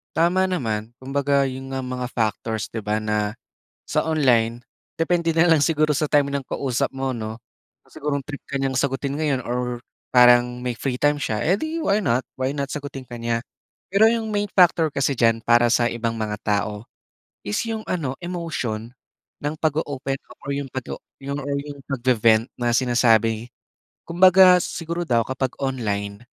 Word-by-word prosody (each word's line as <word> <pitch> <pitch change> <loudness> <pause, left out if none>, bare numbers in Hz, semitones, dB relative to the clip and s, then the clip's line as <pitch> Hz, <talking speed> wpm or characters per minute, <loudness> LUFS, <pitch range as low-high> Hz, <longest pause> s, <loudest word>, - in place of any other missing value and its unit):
Tama 175 +3 +3
naman. 115 -11 -2
Kumbaga 140 +1 +1
'yun 135 +1 -7
nga 130 - -2
mga 125 0 -4
factors 110 -2 -2
'di 110 -2 -6
ba 105 +1 0
na 105 -1 -1 0.5
sa - - -1
online, 120 -6 +2 0.3
depende 165 0 +1
na 165 - +5
lang 165 -4 +5
siguro 155 0 +2
sa 150 +2 0
time 140 -1 +2
ng 140 - 0
kausap 130 -3 -1
mo 135 0 -1
'no. 110 -2 -5 0.5
Siguro 150 -2 -3
kung 140 - -5
trip 145 0 -7
ka 140 - -3
niyang 135 -1 0
sagutin 140 +2 -1
ngayon 140 -5 0
or 125 0 -3 0.2
parang 125 0 +5
may 125 - 0
free 125 +2 -3
time 145 +2 +1
siya, 110 -5 -1
eh, 185 +6 +2
'di 315 +1 -3
why 200 +2 +2
not, 125 - +1 0.2
why 135 +3 -1
not 140 0 -3
sagutin 140 -2 -6
ka 120 -1 -9
niya. 115 0 -1 0.5
Pero 215 +3 +6
'yong 225 -2 -1
main 205 0 0
factor 175 -4 +4
kasi 140 -1 0
diyan 115 -2 +2
para 120 0 +5
sa 120 0 +2
ibang 115 -1 -2
mga 105 -1 -3
tao, 105 +1 -2 0.5
is 105 - -3
'yong 225 -1 -3
ano 145 -8 -1
emotion 155 -11 -4 0.5
ng 145 +2 -2
pag-o-open 145 -3 -2
up - - -14
or 140 - -2
'yong 140 -1 -3
pag-o 130 0 -6 0.2
yung 140 +1 -3
or 140 0 -2
'yong 145 0 -6
pag-ve-vent 120 -3 +2
na 120 0 +2
sinasabi. 115 -2 +2 0.6
Kumbaga 185 +1 +6
siguro 170 +1 -4
daw 115 -2 +3
kapag 130 0 -3
online, 105 -6 -3
135 Hz, 175 wpm, -23 LUFS, 120-150 Hz, 0.6 s, Pero